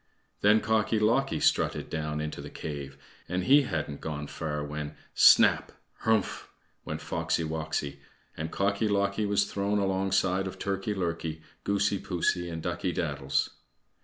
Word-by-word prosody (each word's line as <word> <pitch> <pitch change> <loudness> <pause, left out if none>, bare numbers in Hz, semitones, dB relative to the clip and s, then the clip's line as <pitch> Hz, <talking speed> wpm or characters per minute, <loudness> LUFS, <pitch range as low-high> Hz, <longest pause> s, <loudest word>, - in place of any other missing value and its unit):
Then 105 +2 +5
Cocky 110 0 +1
locky 115 +6 +2
strutted - - +2
down 75 -1 -3
into 75 0 -4
the - - -8
cave, 70 -3 -6 0.3
and 90 +1 -1
he 140 +9 +6
hadn't 75 - -3
gone 75 -2 -4
far 75 -1 -4
when 75 0 -5 0.2
"Snap, - - +6 0.3
Hrumph!" 110 -3 +1 0.4
went - - -5
Foxy 80 - -1
woxy, 75 -3 -3 0.4
and 80 +1 -4
Cocky 100 +4 0
locky 100 +1 +1
was 100 0 +2
thrown 100 +1 -1
alongside 95 -1 +1
of 95 - -7
Turkey 100 +1 -2
lurkey, 85 -3 -3 0.2
Goosey 100 0 +1
poosey, 90 -1 -1
and 80 -1 -5
Ducky 85 +1 -1
daddles. 70 -5 -1
90 Hz, 140 wpm, -29 LUFS, 75-100 Hz, 0.4 s, he